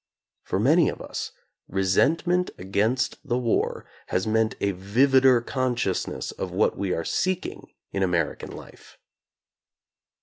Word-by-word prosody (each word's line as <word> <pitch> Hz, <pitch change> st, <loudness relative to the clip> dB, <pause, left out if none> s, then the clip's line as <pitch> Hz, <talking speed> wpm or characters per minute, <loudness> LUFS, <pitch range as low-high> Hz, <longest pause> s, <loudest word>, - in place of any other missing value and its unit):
For -, -, -2 dB
many 155 Hz, -, +4 dB
of -, -, -6 dB
us, -, -, -5 dB, 0.4 s
resentment 160 Hz, -, +2 dB
against 105 Hz, +7 st, 0 dB
the 125 Hz, -4 st, -1 dB
war 120 Hz, -3 st, 0 dB, 0.2 s
has 95 Hz, -, 0 dB
meant 110 Hz, 0 st, +1 dB
a 100 Hz, -, +1 dB
vivider 125 Hz, +6 st, +4 dB
consciousness 125 Hz, -7 st, -1 dB
of 95 Hz, -, -5 dB
what 95 Hz, +4 st, +2 dB
we 100 Hz, -2 st, -2 dB
are 85 Hz, -2 st, -1 dB
seeking 185 Hz, -1 st, -2 dB, 0.2 s
in 100 Hz, -, -2 dB
American 85 Hz, -4 st, 0 dB
life. -, -, -13 dB
110 Hz, 125 wpm, -25 LUFS, 95-130 Hz, 0.4 s, many